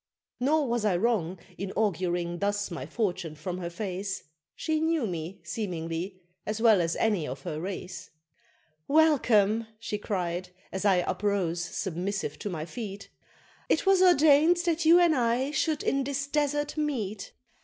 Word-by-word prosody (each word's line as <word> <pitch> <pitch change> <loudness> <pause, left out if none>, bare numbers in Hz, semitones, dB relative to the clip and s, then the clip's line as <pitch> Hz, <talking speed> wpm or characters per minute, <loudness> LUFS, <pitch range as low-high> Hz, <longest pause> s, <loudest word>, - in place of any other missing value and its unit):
Nor 290 +3 +2
was 235 -2 0
I 200 -5 +2
wrong 190 -4 0 0.2
in 195 0 -3
auguring 175 -4 -1
thus 205 -1 -1
my 150 -6 -5
fortune 175 -4 -2
from 180 +4 -5
her 170 -1 -4
face, 190 +1 -4 0.3
She 315 -1 -1
knew 320 -4 +1
me, 170 -1 -5
seemingly, 175 0 -4 0.2
as 215 +1 -3
well 220 -5 +5
as 165 0 0
any 205 -9 +1
of 130 +2 -6
her 155 0 -4
race; 185 -1 -6 0.8
"Welcome!" 230 -8 +4
she 215 -2 -4
cried, 180 -4 -2 0.2
as 190 +2 -3
I 185 -3 +4
uprose 190 -5 0
submissive 180 -3 -3
to 205 - -4
my 160 -4 -4
feet; 200 0 -7 0.6
"It - - +2
was 385 -1 +5
ordained 315 -1 +6
that 335 -1 +1
you 335 +2 +8
and 345 -2 +5
I 250 +2 +1
should 305 0 0
in 275 0 +1
this 275 +1 -2
desert 295 +1 -1
meet! 225 -10 -2
205 Hz, 155 wpm, -28 LUFS, 180-275 Hz, 0.8 s, you